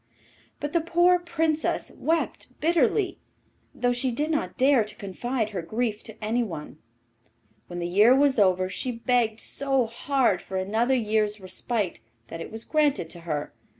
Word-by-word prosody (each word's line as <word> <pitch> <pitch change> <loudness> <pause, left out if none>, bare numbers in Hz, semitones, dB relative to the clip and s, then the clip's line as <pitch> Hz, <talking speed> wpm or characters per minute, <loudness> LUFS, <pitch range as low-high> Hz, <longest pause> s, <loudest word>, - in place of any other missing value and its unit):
But 290 0 -4
the 335 - +3
poor 345 +2 +4
Princess 325 -2 -1
wept 325 +1 -2
bitterly, 340 - +2 0.6
though 245 0 +1
she 250 +2 0
did 295 +6 -1
not 305 - -2
dare 265 -3 +5
to 210 - -7
confide 220 +3 -3
her 190 -4 -3
grief 220 +4 -2
to 220 0 -9
anyone. 210 -10 -2 0.9
When 175 - -7
the 175 - -2
year 210 +8 +6
was 275 -3 +3
over, 185 -2 +3
she 220 +7 -3
begged 230 -2 +1
so 270 -3 +1
hard 235 -3 +1
for 190 - -5
another 220 +7 +1
year's 215 -2 0
respite 190 - -2 0.3
that 165 - -6
it - - -7
was 225 +1 -6
granted 295 - +1
to 175 - -7
her. 150 -1 -2
235 Hz, 155 wpm, -26 LUFS, 205-280 Hz, 0.9 s, year